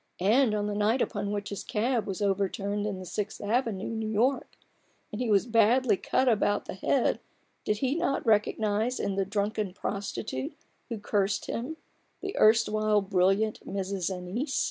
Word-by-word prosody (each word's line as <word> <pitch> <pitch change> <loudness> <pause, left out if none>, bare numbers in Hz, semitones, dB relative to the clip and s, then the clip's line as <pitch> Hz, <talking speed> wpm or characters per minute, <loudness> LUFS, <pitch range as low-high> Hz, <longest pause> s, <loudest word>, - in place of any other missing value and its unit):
And 215 +4 +3
on 205 -1 -1
the 210 - -2
night 210 +5 +2
upon 205 -4 -1
which 205 0 -3
his 200 - -5
cab 230 +1 0
was 195 +1 -3
overturned 200 +1 0
in 200 -2 -3
the 185 - -8
Sixth 200 +4 -4
Avenue, 215 -2 -1
New 220 -1 -3
York, 245 +6 0 0.5
and 210 - -4
he 245 - -1
was 205 0 +4
badly 230 0 +4
cut 260 +7 0
about 205 -3 +2
the - - -5
head, 235 +7 +1 0.5
did 210 - +1
he 265 +3 0
not 325 -4 -1
recognize 215 +2 +1
in 200 - -1
the 195 0 0
drunken 205 -1 -1
prostitute 195 -9 -4 0.3
who 230 - -3
cursed 205 -1 0
him, 270 +8 -4 0.4
the 390 0 -5
erewhile 215 -1 +4
brilliant 195 +2 +2
Mrs. 195 -2 -2
Annice 190 - -3
210 Hz, 165 wpm, -28 LUFS, 200-230 Hz, 0.5 s, was